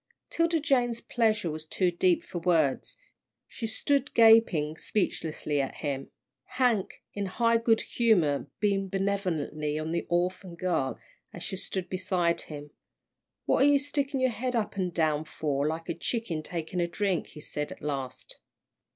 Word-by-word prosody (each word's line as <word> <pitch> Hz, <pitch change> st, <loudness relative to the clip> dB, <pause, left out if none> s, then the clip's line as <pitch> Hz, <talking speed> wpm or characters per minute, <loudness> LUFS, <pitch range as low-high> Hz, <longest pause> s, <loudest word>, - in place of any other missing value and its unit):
'Tilda 335 Hz, 0 st, +2 dB
Jane's 245 Hz, -6 st, +2 dB
pleasure 215 Hz, -9 st, +1 dB
was 155 Hz, 0 st, -5 dB
too 180 Hz, +3 st, +1 dB
deep 175 Hz, 0 st, +2 dB
for 175 Hz, -, -5 dB
words. 165 Hz, -6 st, +1 dB, 0.5 s
She 230 Hz, -, -5 dB
stood 280 Hz, +5 st, 0 dB
gaping 220 Hz, -10 st, +6 dB
speechlessly 155 Hz, -6 st, -1 dB
at 135 Hz, -, -4 dB
him. 140 Hz, -3 st, -3 dB, 0.5 s
Hank, 240 Hz, -7 st, +1 dB
in 200 Hz, -1 st, -2 dB
high 230 Hz, +4 st, +2 dB
good 230 Hz, -1 st, +3 dB
humour, 180 Hz, -12 st, +2 dB
beamed 195 Hz, -2 st, +1 dB
benevolently 180 Hz, -6 st, -1 dB
on 155 Hz, +1 st, -3 dB
the 170 Hz, -, -2 dB
orphan 180 Hz, +1 st, -1 dB
girl 170 Hz, -8 st, -1 dB, 0.3 s
as -, -, -8 dB
she -, -, -3 dB
stood 190 Hz, -1 st, -3 dB
beside 180 Hz, -2 st, 0 dB
him. 145 Hz, -1 st, -9 dB, 0.7 s
"What -, -, +3 dB
are -, -, +6 dB
you 290 Hz, 0 st, +6 dB
sticking 280 Hz, -1 st, -1 dB
your 260 Hz, -1 st, +3 dB
head 250 Hz, +2 st, -2 dB
up 220 Hz, -3 st, -1 dB
an 185 Hz, -2 st, 0 dB
down 155 Hz, -3 st, +1 dB
for 145 Hz, -2 st, -1 dB
like 160 Hz, +1 st, -3 dB
a -, -, -1 dB
chicken 185 Hz, -4 st, -2 dB
taking 170 Hz, +2 st, -3 dB
a 170 Hz, -, +1 dB
drink?" 190 Hz, 0 st, -1 dB
he -, -, -12 dB
said 150 Hz, 0 st, -4 dB
at -, -, -10 dB
last. 135 Hz, -3 st, -3 dB
180 Hz, 160 wpm, -28 LUFS, 155-225 Hz, 0.7 s, gaping